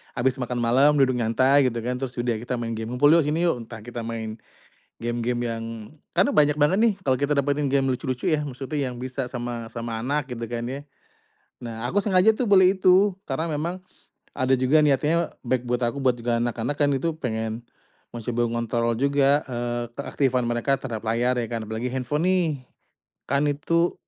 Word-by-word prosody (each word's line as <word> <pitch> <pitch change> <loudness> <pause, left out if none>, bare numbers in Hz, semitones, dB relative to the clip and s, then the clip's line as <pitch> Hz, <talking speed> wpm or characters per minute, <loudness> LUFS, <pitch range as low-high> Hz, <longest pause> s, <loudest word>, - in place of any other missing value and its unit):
abis 125 +1 +1
makan 125 -1 -2
malam 135 +6 +4
duduk 130 -2 +3
nyantai 130 +5 +3
gitu 120 - -3
kan 125 +1 -2
terus 130 -1 -4
udah 120 -2 0
kita 125 +2 -5
main 115 -1 -3
game 110 0 -4
ngumpul 145 +4 +4
yuk 165 -1 +5
sini 155 +4 0
yuk 130 -8 +1
entah 115 -1 -9
kita 120 +1 -7
main, 115 -1 -5 0.6
game-game 120 +1 -1
yang 115 -1 -4 0.5
karena - - +3
banyak 150 0 +4
banget 150 +6 +4
nih 230 -3 +4
kalau 130 - +4
kita 145 +1 0
dapetin 145 0 +1
game 135 -1 +3
lucu-lucu 130 0 -2
ya 150 -2 +1
maksudnya 135 +1 -3
yang 125 -1 -8
bisa 130 +1 -3
sama 120 -2 -4
sama 115 -1 -4
anak 145 +1 -1
gitu 115 -1 -5
kan 120 0 -3
ya. 135 +2 -5 0.8
Nah, 115 -1 -6
aku 205 - +2
sengaja 195 +1 +4
tuh 240 +2 -2
beli 190 -1 +6
itu 185 +3 +5 0.2
karena 155 +5 -1
memang, 165 +5 -2 0.6
ada 130 -1 0
juga 130 +5 +4
niatnya 150 +4 +2 0.2
baik 125 0 +1
buat 125 0 0
aku 120 +4 -2
buat 130 -2 +3
juga 115 0 0
anak-anak 120 +3 -2
kan 145 - +3
itu 165 +5 0
pengen, 110 -2 -2 0.5
mencoba 120 +1 -2
mengontrol 115 0 0
juga, 140 +1 +3
eee, 120 -1 -2
keaktifan 135 -2 0
mereka 120 +4 +1
terhadap 115 -4 -5
layar 120 +3 +1
ya 115 - -2
kan? 115 -2 -3
Apalagi 110 +3 -4
handphone 130 +5 -1
nih, 185 -2 +3 0.8
kan 140 +1 +2
itu, 165 +4 +1
130 Hz, 185 wpm, -24 LUFS, 120-145 Hz, 0.8 s, beli